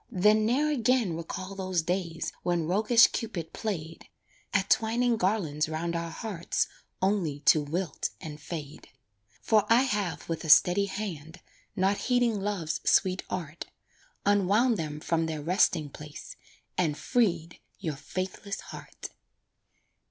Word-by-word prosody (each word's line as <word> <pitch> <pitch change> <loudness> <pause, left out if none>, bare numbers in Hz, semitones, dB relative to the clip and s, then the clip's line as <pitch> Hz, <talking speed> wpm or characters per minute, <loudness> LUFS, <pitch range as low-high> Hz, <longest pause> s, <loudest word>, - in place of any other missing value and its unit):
Then 210 +3 +3
ne'er 290 +6 +2
again 245 - +2
recall 185 +3 -6
those 185 -3 -1
days 175 -1 -2
When 175 -2 0
roguish 215 +7 +5
Cupid 170 -8 -4
played 165 -7 -5 0.4
At 200 -1 +1
twining 235 +1 +3
garlands 180 -7 0
'round 170 +2 -2
our 170 0 -2
hearts 175 0 -2 0.4
Only 180 -8 0
to 150 +1 +5
wilt 160 +2 -2
and 150 -1 -8
fade; 150 -2 -7 0.5
For 215 -2 +4
I 235 +3 +6
have 205 -8 -2
with 165 0 -3
a 160 - -5
steady 180 +6 +6
hand, 180 -5 -6 0.4
Not 195 +2 +2
heeding 245 -4 +1
Love's 195 -6 -2
sweet 185 0 +3
art, 165 -3 -5 0.6
Unwound 205 +4 +3
them 150 -2 -4
from 165 0 0
their 155 -2 -4
resting 170 -2 +2
place 150 +1 -10 0.4
And 155 -5 +1
freed 175 -9 0 0.2
your 160 -7 -3
faithless 185 +6 -5
heart. - - -9
185 Hz, 130 wpm, -28 LUFS, 160-210 Hz, 0.6 s, I